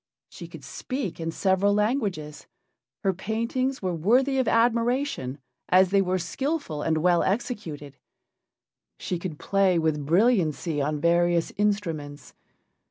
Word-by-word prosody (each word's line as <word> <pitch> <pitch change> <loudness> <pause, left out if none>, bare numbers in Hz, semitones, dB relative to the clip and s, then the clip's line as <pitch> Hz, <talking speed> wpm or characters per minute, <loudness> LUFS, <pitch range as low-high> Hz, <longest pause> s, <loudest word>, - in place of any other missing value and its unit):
She - - -10
could - - -12
speak 255 -11 -5
in 165 0 -3
several 190 +4 +2
languages, 205 - -2 0.6
her 195 - +2
paintings 230 +6 -2
were 185 -1 -1
worthy 250 - +2
of 255 - +1
admiration, 235 - +1 0.3
as 185 0 +5
they 200 0 +4
were 185 0 0
skillful 265 - -3
and 160 +1 0
well 175 -1 +4
executed; 175 - -3 1.0
she 180 - -3
could 170 -4 -5
play 195 -1 +2
with 160 -2 0
brilliancy 170 - +2
on 150 +1 -1
various 170 +1 +2
instruments. 165 -9 -2
185 Hz, 125 wpm, -26 LUFS, 160-230 Hz, 1.0 s, as